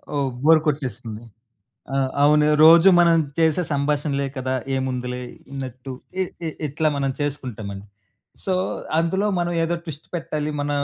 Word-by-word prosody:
ఓహ్! 140 -1 +1 0.2
Bore 160 0 +6
కొట్టేస్తుంది. 120 -6 -3 0.7
ఆ! - - +1 0.3
అవును. 150 0 +5 0.2
రోజు 170 +3 +8
మనం 170 -1 +5 0.2
చేసే 160 +2 +3
సంభాషణలే 140 0 0
కదా, 130 0 -2 0.2
ఏముందిలే 125 -1 -3 0.3
అన్నట్టు 130 -1 -6 0.3
ఇ - - +4 0.2
ఇ - - -1 0.2
ఇట్లా 155 +2 0
మనం 135 -1 0
చేసుకుంటామండి. 110 -9 -5 0.6
సో, 190 - 0 0.5
అందులో 190 +5 +1
మనం 175 0 -1
ఏదో 170 +1 0
ట్విస్ట్ 155 -2 -8
పెట్టాలి, 155 -3 -3
మన 145 0 -2
145 Hz, 135 wpm, -22 LUFS, 130-160 Hz, 0.7 s, రోజు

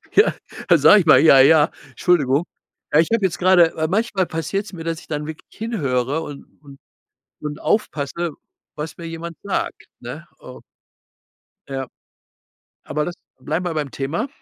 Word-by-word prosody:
Ja, 420 - +5 0.4
sage 210 - +7
ich - - -5
mal: 155 - +7
„Ja, 140 -3 +7
ja.“ 150 +2 +6 0.2
Entschuldigung. 150 -3 +1 0.5
Ja, 150 - +6
ich 160 - +3
habe 225 -4 +2
jetzt 175 -2 -1
grade 175 -2 +5
weil 160 0 -1
manchmal 200 -1 0
passiert 175 +5 -3
es - - -11
mir, 165 -3 -7
dass 165 -1 -2
ich - - -17
dann 150 0 -4
wirklich 160 0 -8
hinhöre 145 - -1
und 145 -3 -8 0.2
und 140 -2 -15 0.6
und 150 0 -5
aufpasse, 170 -4 -1 0.4
was 150 +1 -6
mir 170 - -8
jemand 165 +1 -7
sagt, 200 - -3
ne? - - -8
Oh. - - -12 1.1
Ja. 135 -1 -4 1.0
Aber 150 0 -2
das 175 - -5 0.3
bleiben 160 +4 -2
wir 175 -2 -2
beim 150 -3 -2
Thema. 160 - -3
160 Hz, 160 wpm, -21 LUFS, 150-180 Hz, 1.1 s, sage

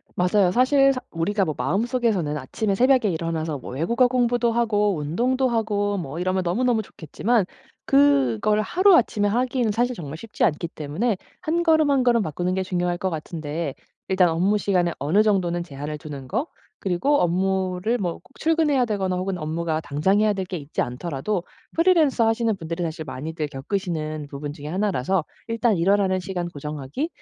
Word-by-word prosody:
맞아요. 180 +1 +3
사실 275 +3 +4
사 255 - -4
우리가 195 +5 0
뭐 155 - -2
마음속에서는 195 - 0
아침에 195 +9 -2
새벽에 255 +1 +4
일어나서 160 -3 -2
뭐 125 - -9
외국어 235 - +2
공부도 245 -1 +1
하고 210 -4 +1
운동도 245 - 0
하고 210 -3 0
뭐 160 -4 -5
이러면 185 +1 0
너무너무 225 +6 +1
좋겠지만 205 +4 -1 0.4
그걸 140 - +3
하루아침에 300 - +3
하기에는 245 +1 +1
사실 245 +3 0
정말 155 -3 -7
쉽지 225 +4 -2
않기 165 +2 0
때문에 165 +9 -2 0.2
한 340 0 0
걸음 315 -3 +4
한 275 -2 +3
걸음 240 -2 +3
바꾸는 175 +2 -2
게 190 - 0
중요할 175 -1 -1
것 190 - -1
같은데 155 -2 -4 0.3
일단 185 -2 +4
업무 185 +6 +2
시간에 180 -4 +1
어느 160 +10 +3
정도는 180 -5 +1
제한을 150 -1 -6
두는 140 -3 -8
거 230 - -1 0.3
그리고 195 +11 +1
업무를 185 +4 0
뭐 180 -7 -2
꼭 - - -16 0.2
출근해야 315 -5 +2
되거나 195 -4 -1
혹은 185 0 -2
업무가 160 0 -2
당장 155 +7 +1
해야 215 0 +3
될 195 -2 -3
게 180 - -4
있지 145 -2 -4
않더라도 170 +8 -3 0.3
프리랜서 325 -9 +4
하시는 225 -1 +1
분들이 165 0 -5
사실 160 -1 -4
많이들 150 +4 -4
겪으시는 155 0 -3
부분 145 +1 -6
중에 145 -1 -9
하나라서 185 -1 0 0.2
일단 230 -2 +1
일어나는 190 +2 +2
시간 180 -2 -4
고정하기 150 - -5
185 Hz, 395 characters per minute, -23 LUFS, 160-230 Hz, 0.4 s, 사실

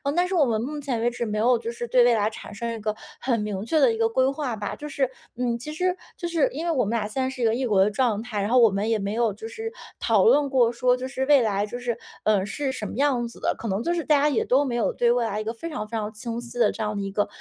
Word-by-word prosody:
但 355 +1 +2
是 380 - -4
我 315 -5 +5
们 220 -3 0
目 295 +5 -4
前 265 -5 -2
为 240 - +2
止 240 0 -3
没 215 -1 -2
有 240 +3 +4
就 230 0 -4
是 240 0 -5
对 245 +1 +5
未 245 - +5
来 210 -1 +1
产 220 - -10
生 235 +2 -3
一 225 - -6
个 215 0 -2 0.2
很 245 -2 0
明 210 -1 -3
确 310 +7 +2
的 265 -5 +5
一 - - -4
个 225 0 +3
规 260 +3 +2
划 275 -4 -3
吧。 210 -1 -4
就 295 - -7
是， 275 -3 0 0.3
嗯， 240 -1 -1
其 300 +6 -7
实 360 +3 0 0.2
就 345 - -3
是 335 -4 +2
因 310 +5 -4
为 340 - +1
我 265 -8 +1
们 205 - -2
俩 210 -2 -2
现 240 +5 -3
在 260 - 0
是 260 -1 -7
一 - - +2
个 220 - +3
异 255 +3 -1
国 200 -4 +4
的 210 - +1
状 225 -2 +1
态， 220 -4 -3
然 200 - -1
后 255 - +4
我 230 -2 +7
们 200 +2 -1
也 225 - +2
没 200 0 -3
有 230 -2 +1
就 220 +3 -8
是 445 - -6 0.3
讨 - - +3
论 295 -11 +5
过， 250 -4 +3
说 250 +1 +2
就 255 +1 -4
是 265 0 -2
未 285 -1 +6
来 205 -3 +1
就 240 +3 -6
是， 245 -1 -2 0.3
呃， 205 -3 +2
是 270 +6 -2
什 225 -5 -5
么 - - -6
样 260 -3 +1
子 235 - -13
的， - - 0
可 230 - -6
能 195 +1 -1
就 345 - 0
是 340 -1 -1
大 300 -1 +4
家 290 - +3
也 275 - +1
都 265 +3 +3
没 245 -3 -2
有 235 - +1
对 240 -1 +2
未 240 -1 +2
来 210 -1 -2
一 - - -4
个 220 +1 -3
非 330 +9 -7
常 300 -9 -4
非 225 +1 -4
常 210 -1 -3
清 230 +1 -5
晰 240 0 -9
的 225 -3 +4
这 - - -7
样 210 0 -2
的 200 - -2
一 195 0 -4
个 205 +1 0
235 Hz, 355 characters per minute, -25 LUFS, 215-270 Hz, 0.3 s, 我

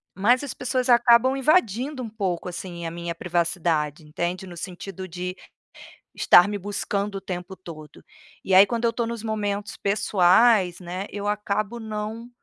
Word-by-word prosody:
mas 240 +8 +3
as 280 - -5
pessoas 255 +1 -2
acabam 240 +2 +5
invadindo 265 - +1
um 225 - -6
pouco, 190 -5 -3
assim, 175 -1 -7
a - - -5
minha 170 0 -5
privacidade, 165 -3 -1
entende? 175 +4 -3
No 175 -1 -10
sentido 185 +1 -7
de 180 +1 -5 0.8
estar 175 - +6
me 205 - -2
buscando 200 +1 -3
o - - -7
tempo 180 +1 -6
todo. 155 -5 -12 0.4
E 190 - +2
aí, 195 +2 +9
quando 235 +1 -2
eu - - +4
estou 235 0 -2
nos 235 -2 -5
momentos 205 -2 -3
pessoais, 195 -1 +3
né, 180 +2 -5
eu 205 0 -4
acabo 210 +2 -2
não 220 +2 -5
200 Hz, 160 wpm, -24 LUFS, 180-230 Hz, 0.8 s, aí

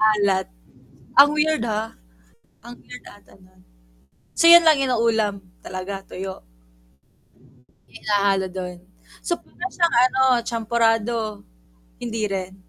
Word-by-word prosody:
Alat. 205 -3 +2 0.7
Ang 280 +1 +9
weird, 305 -3 +1
ah. 220 0 -3 0.7
Ang 240 0 -10
weird 250 - -12
ata 205 - -17
nun. 185 0 -24 0.7
So 335 - +4
yun 340 0 +9
lang 315 -3 +4
yun 270 -2 0
na 245 - 0
ulam, 220 -4 0 0.2
talaga, 190 +1 -6
tuyo? 190 0 -7 1.5
Hinahalo 200 -2 0
dun. 180 -1 -7 0.5
So 345 - -1
para 350 - -9
siyang 340 -3 0
ano 260 +1 0 0.3
champorado. 225 -1 -1 0.6
Hindi 225 -2 -4
rin? 190 -2 -5
215 Hz, 120 wpm, -22 LUFS, 195-250 Hz, 1.5 s, Ang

